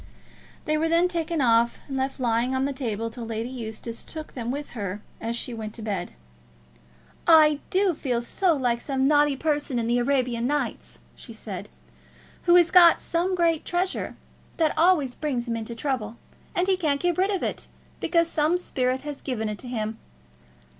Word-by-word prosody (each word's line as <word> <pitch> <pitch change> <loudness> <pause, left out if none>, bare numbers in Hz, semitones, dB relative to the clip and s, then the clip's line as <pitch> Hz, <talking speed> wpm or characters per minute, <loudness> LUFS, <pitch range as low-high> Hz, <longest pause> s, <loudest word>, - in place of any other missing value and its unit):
They 305 0 +1
were 325 +1 +1
then 335 +2 +4
taken 335 -3 -1
off 235 -1 +3
and 270 - -5
left 265 +1 -2
lying 240 +1 +1
on 260 +1 +1
the 280 - -1
table 230 -4 -3
till 235 +1 -8
Lady 225 +2 -4
Eustace 230 -1 -6
took 315 -1 -8
them 240 -2 -4
with 285 +3 -4
her 205 -3 -4 0.2
as 230 +1 -2
she 240 +1 -4
went 220 -1 -6
to 225 - -7
bed. 200 -5 -3 1.1
"I 310 -3 +7
do 380 -1 +2
feel 250 -6 -2
so 350 +7 +2
like 245 -3 0
some 270 -1 0
naughty 295 -1 +4
person 290 -3 -1
in 230 - 0
the 240 +1 +2
'Arabian 245 -2 +1
Nights,'" 270 - -2 0.2
she - - -12
said, - - -7 0.8
"who 345 - +6
has 345 -1 +6
got 345 -2 +8
some 355 +3 -1
great 335 -3 +2
treasure 365 +1 -2 0.4
that 320 -2 +2
always 320 -7 +3
brings 255 -5 -2
him 230 - -1
into 230 +1 -5
trouble; 235 -4 -3 0.4
but 355 - +2
he 380 -1 +2
can't 300 -6 +1
get 350 +1 0
rid 385 +2 +3
of 390 -3 -1
it, - - -3 0.3
because 335 0 +2
some 315 +2 +2
spirit 255 -6 -1
has 290 -1 -7
given 220 -5 -2
it 210 - -5
to 255 - -10
him. 220 -2 -3
270 Hz, 185 wpm, -25 LUFS, 235-325 Hz, 1.1 s, got